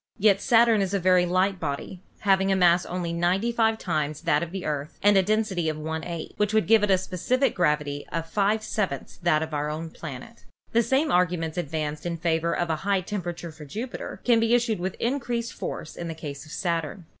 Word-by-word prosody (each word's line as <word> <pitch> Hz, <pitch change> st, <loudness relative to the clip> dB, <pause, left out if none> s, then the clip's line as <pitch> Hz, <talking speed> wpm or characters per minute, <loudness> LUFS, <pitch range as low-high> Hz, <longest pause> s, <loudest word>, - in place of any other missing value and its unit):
Yet 200 Hz, -2 st, +4 dB
Saturn 230 Hz, -2 st, +5 dB
is 195 Hz, 0 st, 0 dB
a -, -, +1 dB
very 180 Hz, -1 st, +4 dB
light 185 Hz, +2 st, +1 dB
body, 155 Hz, +4 st, -4 dB, 0.2 s
having 195 Hz, -1 st, +3 dB
a -, -, +3 dB
mass 175 Hz, -1 st, +4 dB
only 175 Hz, -1 st, -3 dB
95 220 Hz, +6 st, +1 dB
times 155 Hz, -6 st, -2 dB
that 160 Hz, -3 st, +2 dB
of 170 Hz, -1 st, -4 dB
the 190 Hz, -1 st, -5 dB
Earth 145 Hz, 0 st, -3 dB
and 205 Hz, 0 st, +6 dB
a 195 Hz, -, +6 dB
density 195 Hz, -4 st, 0 dB
of 155 Hz, -, -3 dB
one 160 Hz, +1 st, -4 dB
eighth, 170 Hz, -2 st, -5 dB
which 210 Hz, +1 st, +1 dB
would 220 Hz, -, +3 dB
give 225 Hz, -1 st, +5 dB
it 210 Hz, -, +1 dB
a 190 Hz, -, +5 dB
specific 190 Hz, +9 st, 0 dB
gravity 150 Hz, -4 st, 0 dB
of 165 Hz, -1 st, -2 dB
five 205 Hz, +5 st, +1 dB
sevenths 195 Hz, -10 st, -3 dB
that 160 Hz, -3 st, +3 dB
of 160 Hz, -1 st, -7 dB
our 150 Hz, 0 st, -1 dB
own 160 Hz, +2 st, -5 dB
planet. 140 Hz, -, -9 dB, 0.3 s
The 230 Hz, -, +4 dB
same 265 Hz, +6 st, +1 dB
arguments 170 Hz, -3 st, +1 dB
advanced 155 Hz, -2 st, -3 dB
in 170 Hz, -1 st, -3 dB
favor 165 Hz, 0 st, 0 dB
of 170 Hz, 0 st, -1 dB
a 160 Hz, -, 0 dB
high 195 Hz, +2 st, 0 dB
temperature 175 Hz, -3 st, -5 dB
for 155 Hz, 0 st, -12 dB
Jupiter 225 Hz, -, -6 dB
can 235 Hz, -2 st, +4 dB
be 225 Hz, -, +2 dB
used 235 Hz, -3 st, +2 dB
with 185 Hz, +1 st, -3 dB
increased 235 Hz, -2 st, -2 dB
force -, -, -6 dB
in 170 Hz, -, -5 dB
the 165 Hz, -, -5 dB
case 145 Hz, -2 st, -7 dB
of -, -, -13 dB
Saturn. 170 Hz, -1 st, -2 dB
180 Hz, 215 wpm, -26 LUFS, 160-210 Hz, 0.3 s, and